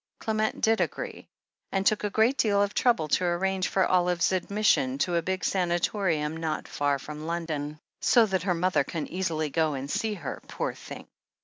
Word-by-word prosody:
Qement 220 Hz, 0 st, -1 dB
did 225 Hz, 0 st, +3 dB
agree, -, -, -4 dB, 0.4 s
and 195 Hz, 0 st, 0 dB
took 215 Hz, 0 st, +3 dB
a 210 Hz, -, 0 dB
great 220 Hz, +6 st, +3 dB
deal 205 Hz, -6 st, +2 dB
of 205 Hz, 0 st, +1 dB
trouble 230 Hz, -11 st, +2 dB
to 185 Hz, -, +2 dB
arrange 185 Hz, +2 st, 0 dB
for 190 Hz, -, +2 dB
Olive's 180 Hz, -1 st, +2 dB
admission 185 Hz, -8 st, +1 dB
to 175 Hz, +4 st, 0 dB
a 170 Hz, -, +2 dB
big 185 Hz, +2 st, -3 dB
sanatorium 175 Hz, -3 st, 0 dB
not 160 Hz, -2 st, -3 dB
far 145 Hz, -1 st, 0 dB
from 150 Hz, +3 st, -8 dB
London. 155 Hz, -3 st, -3 dB, 0.2 s
"So 235 Hz, -2 st, +5 dB
that 190 Hz, -4 st, -1 dB
her 180 Hz, 0 st, 0 dB
mother 180 Hz, -3 st, +2 dB
can 155 Hz, +2 st, -4 dB
easily 165 Hz, -5 st, -2 dB
go 160 Hz, -2 st, +1 dB
and 135 Hz, +1 st, -5 dB
see 220 Hz, -1 st, -1 dB
her, 180 Hz, -, -6 dB
poor -, -, -3 dB
thing." -, -, -10 dB
180 Hz, 185 wpm, -27 LUFS, 155-200 Hz, 0.4 s, So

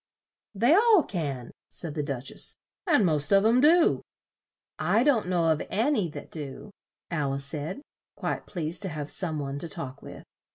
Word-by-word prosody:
"They 235 Hz, +9 st, +4 dB
all 425 Hz, -2 st, +6 dB
can," 140 Hz, -, -4 dB, 0.2 s
said 160 Hz, -3 st, -4 dB
the 150 Hz, -, -2 dB
Duch 135 Hz, -3 st, -4 dB
ess; -, -, -2 dB, 0.3 s
"and 290 Hz, -, +4 dB
most 150 Hz, -4 st, +1 dB
of 195 Hz, +1 st, +5 dB
'em 235 Hz, +3 st, +5 dB
do." 325 Hz, +3 st, +5 dB, 0.8 s
"I 230 Hz, -, +3 dB
don't 255 Hz, -9 st, +3 dB
know 175 Hz, -3 st, +2 dB
of 155 Hz, -1 st, +2 dB
an 235 Hz, +9 st, +1 dB
y 205 Hz, -9 st, +1 dB
that -, -, -9 dB
do," 150 Hz, +5 st, -8 dB, 0.4 s
Al 145 Hz, -5 st, 0 dB
ice 140 Hz, 0 st, -3 dB
said, 155 Hz, -, -5 dB, 0.3 s
quite -, -, -3 dB
pleased 170 Hz, -2 st, -2 dB
to 195 Hz, -, -1 dB
have 150 Hz, -2 st, -5 dB
some 165 Hz, -5 st, -1 dB
one 140 Hz, -1 st, -4 dB
to 170 Hz, -, -5 dB
talk 140 Hz, -3 st, -7 dB
with. -, -, -10 dB
170 Hz, 180 wpm, -27 LUFS, 145-220 Hz, 0.8 s, all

